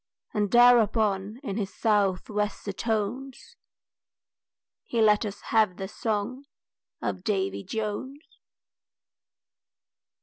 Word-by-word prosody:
And 210 -2 0
thereupon 220 -3 +4
in 200 -6 -4
his 200 -3 -2
south 200 -4 +1
wester 210 -1 -2
tones 240 - -3 1.3
He 235 - -3
let 215 0 +4
us 200 - -8
have 215 -5 +3
the 190 - -4
song 225 +6 -3 0.6
of 185 - -3
Davy 195 -2 -1
Jones. 220 - -4
210 Hz, 95 wpm, -27 LUFS, 200-230 Hz, 1.3 s, thereupon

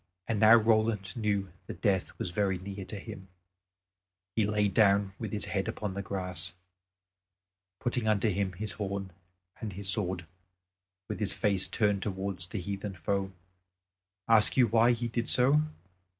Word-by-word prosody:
And 115 -2 0
now 110 +1 +8
Roland 110 -2 +2
knew 100 -5 -1
that 85 - -7
death 95 -3 +1
was 90 - -3
very 95 0 +1
near 95 +1 -7
to 105 - -6
him. 95 0 -9 1.1
He 110 -3 +2
laid 105 -1 +2
himself 110 -2 +7
down 100 0 +1
with 110 -3 -4
his 105 - -2
head 95 +1 -2
upon 105 -3 -3
the 100 - -3
grass, 90 -3 -4 1.2
putting 120 -2 -1
under 110 0 +3
him 100 -1 -1
his 105 +4 -3
horn 100 -2 -4 0.5
and 110 -4 -5
his 100 +1 -4
sword, 95 -3 0 0.8
with - - -4
his 105 -3 -1
face 100 -4 +1
turned 105 -3 +1
towards 95 -3 -3
the 105 - -4
heathen 100 +2 -4
foe. 95 +3 -1 1.0
Ask 115 +1 +5
you 125 - +7
why 115 +2 +4
he 120 0 -2
did 115 +1 -2
so? 135 +4 +4
100 Hz, 160 wpm, -30 LUFS, 95-110 Hz, 1.2 s, now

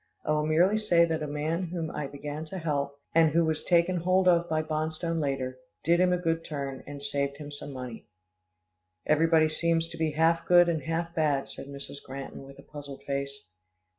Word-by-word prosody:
I - - 0
will 150 0 +1
merely 180 +7 +4
say 175 -6 +4
that 160 -1 -2
a 150 - -2
man 155 +5 -2
whom 165 -2 -4
I 145 - -3
began 145 +2 -6
to 190 +4 -7
help, 140 -4 -2 0.2
and 165 -1 +6
who 165 +2 +3
was 160 -1 -1
taken 175 +1 +3
hold 185 +2 +2
of 175 -1 +4
by 155 0 +1
Bonstone 155 +2 -2
later, 135 -3 -2 0.2
did 170 +2 +3
him 180 0 +4
a 180 - +3
good 165 -2 -1
turn, 140 -4 -5
and 140 0 -8
saved 140 -1 -1
him 145 -1 -8
some 145 0 -6
money." 125 -3 -7 1.0
"Everybody 160 +1 +4
seems 165 +1 +1
to - - -9
be 160 -2 0
half 165 +2 +2
good 175 -1 +7
and 165 -3 0
half 165 +3 -2
bad," 150 -4 +1
said - - -8
Mrs. 140 0 -7
Granton 135 +1 -7
with 135 0 -13
a 140 - -13
puzzled 145 -2 -10
face. 140 0 -3
155 Hz, 200 wpm, -28 LUFS, 140-170 Hz, 1.0 s, good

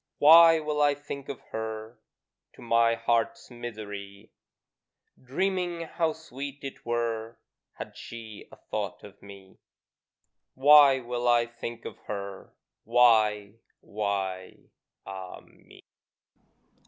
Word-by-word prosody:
Why 165 +2 +8
will 150 -1 -2
I 145 -1 +4
think 140 -1 -8
of 140 - -6
her 110 +1 -6 0.5
To - - -16
my 115 0 +3
heart's 115 +2 -1
misery? 105 -3 -8 0.9
Dreaming 180 +5 -2
how 165 0 -1
sweet 140 -3 -8
it 135 - -8
were 115 -1 -3 0.4
Had - - -9
she 110 -2 -10
a - - -12
thought - - -5
of 100 -1 -14
me: 100 -1 -14 1.0
Why 140 0 +7
will 120 0 -3
I 120 -1 +4
think 120 0 -8
of - - -8
her! 100 -2 -6 0.3
Why, 110 -3 +3 0.2
why, 95 -3 -4 0.3
ah 95 -1 -8
me! - - -20
115 Hz, 110 wpm, -27 LUFS, 105-140 Hz, 1.0 s, Why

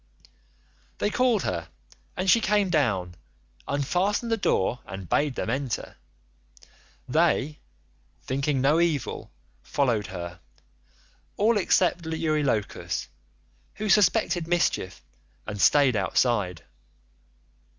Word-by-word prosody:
"They 205 - 0
called 245 -5 +2
her 85 -3 -3 0.5
and 185 - -2
she 230 +5 +5
came 205 -3 +2
down, 100 - +1 0.5
unfastened 185 - 0
the - - +4
door, 125 - 0
and 95 -2 -7
bade 145 - +1
them 115 - -2
enter. 135 -2 -3 1.1
They, 155 0 +1 0.6
thinking 135 +1 -1
no 145 +5 +3
evil, 165 -6 -1 0.3
followed 105 - 0
her, 85 -2 -7 1.0
all 225 +3 +3
except 180 -3 +2
Eurylochus, 155 -9 -1 0.7
who 215 0 -3
suspected 195 -4 +3
mischief 170 - 0 0.4
and 105 -2 -5
staid 140 -4 +5
outside. 100 -2 0
145 Hz, 100 wpm, -26 LUFS, 105-180 Hz, 1.1 s, she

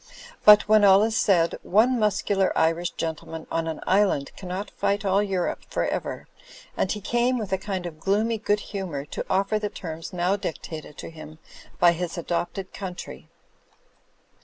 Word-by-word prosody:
But, 210 0 +8
when 215 0 +5
all 195 0 +7
is 220 0 0
said, 175 -7 +2
one 235 +5 +3
muscular 200 -2 +1
Irish 165 +2 +2
gentleman 160 0 -5
on 165 0 -1
an 160 -1 -4
island 190 -8 +2
cannot 185 +2 -5
fight 200 +1 -1
all 195 +1 +3
Europe 190 -3 -1
for - - -1
ever, - - -4 0.5
and 190 - 0
he 210 - -2
came, 240 +4 +1
with 210 -5 -3
a 190 - +1
kind 190 -2 -4
of 160 -3 -7
gloomy 215 +5 +1
good 205 -1 +1
hu 195 -2 -3
mour, 140 -4 -5
to - - -4
offer 195 +3 +1
the 210 -1 -2
terms 165 -3 -7
now 180 +1 +1
dictated 160 -6 -6
to - - -8
him 155 -1 -11 0.4
by 175 -1 +6
his 175 +1 -4
adopted 175 +3 -3
country. 185 -3 -7
190 Hz, 170 wpm, -25 LUFS, 170-205 Hz, 0.5 s, But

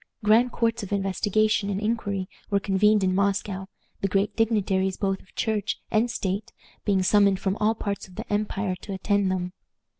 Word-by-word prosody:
Grand 225 +4 +4
courts 230 0 0
of 200 - -7
investigation 205 +1 +1
and 195 -1 -1
inquiry 205 -3 -1 0.2
were 200 -1 +2
convened 205 +1 +3
in 185 0 +2
Moscow, 195 0 0 0.3
the 195 - +1
great 195 +2 0
dignitaries 195 -4 +1
both 195 -1 0
of 195 - -25
Church 215 -2 -1
and 225 +3 +2
state 200 -2 -3 0.3
being 195 -3 +2
summoned 200 0 +4
from 190 0 0
all 215 +1 +2
parts 200 -3 -4
of 185 - -16
the - - -6
empire 205 -2 -1
to 200 - -6
attend 195 0 +1
them. 180 -1 -2
200 Hz, 175 wpm, -26 LUFS, 190-215 Hz, 0.3 s, Grand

